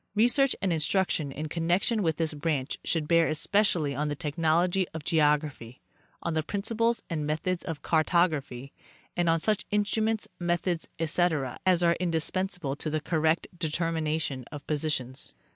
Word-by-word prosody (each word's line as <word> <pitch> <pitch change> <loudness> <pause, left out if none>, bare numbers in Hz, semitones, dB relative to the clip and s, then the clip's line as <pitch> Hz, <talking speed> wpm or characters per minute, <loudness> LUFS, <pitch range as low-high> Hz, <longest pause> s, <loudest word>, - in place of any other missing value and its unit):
Research 245 +5 +4
and 190 -3 +2
instruction 160 -2 +1
in 150 +3 -4
connection 175 +8 +1
with 160 -5 +1
this 160 -2 0
branch 145 -2 -2
should 160 -3 0
bear 165 0 +4
especially 155 -2 +1
on 150 +2 -1
the 150 - -2
technology 165 +5 +1
of 160 - -5
geography, 150 -6 +1 0.4
on 170 - -1
the 160 - +1
principles 225 +6 -1
and 160 -3 -2
methods 170 +4 -1
of 165 -4 -5
car 160 -1 +3
tography, 145 -7 0 0.4
and 175 -1 +2
on 165 0 +3
such 210 +4 0
instruments, 215 +1 0
methods, 175 -1 -1
etc, 160 -5 0
as 180 -2 +4
are 170 0 +4
indis 165 -3 -1
pensable 180 -7 -2
to 155 - -3
the 155 0 0
correct 160 +2 +1
determination 160 -4 -1
of 145 -2 -8
positions. 145 -4 -2
165 Hz, 155 wpm, -28 LUFS, 150-180 Hz, 0.4 s, Research